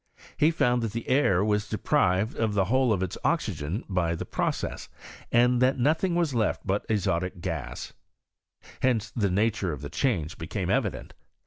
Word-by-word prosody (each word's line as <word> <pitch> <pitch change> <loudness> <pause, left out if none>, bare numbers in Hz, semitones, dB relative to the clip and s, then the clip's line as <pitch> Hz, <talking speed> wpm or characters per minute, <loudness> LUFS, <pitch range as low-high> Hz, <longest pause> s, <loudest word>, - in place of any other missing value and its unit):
He 155 - +4
found 125 -7 +2
that 115 -2 -3
the 115 - -5
air 105 -8 +3
was 105 -1 0
deprived 95 +5 +1
of 110 -2 0
the 95 -2 +3
whole 130 +3 +2
of 95 -3 +1
its 90 - -4
oxygen 80 - -1
by 85 -4 0
the - - -5
process, - - -3 0.4
and 120 +1 +4
that 130 +1 +3
nothing 160 +7 +1
was 170 -5 +1
left 110 -4 0
but 100 +3 -1
azotic 90 -4 0
KEks, - - -5 0.9
Hence 115 -5 +1
the 105 -4 0
nature 100 -1 +1
of 75 - -6
the - - -6
change 90 - -1
became - - -3
evi - - +2
dent. - - -10
110 Hz, 175 wpm, -27 LUFS, 95-125 Hz, 0.9 s, He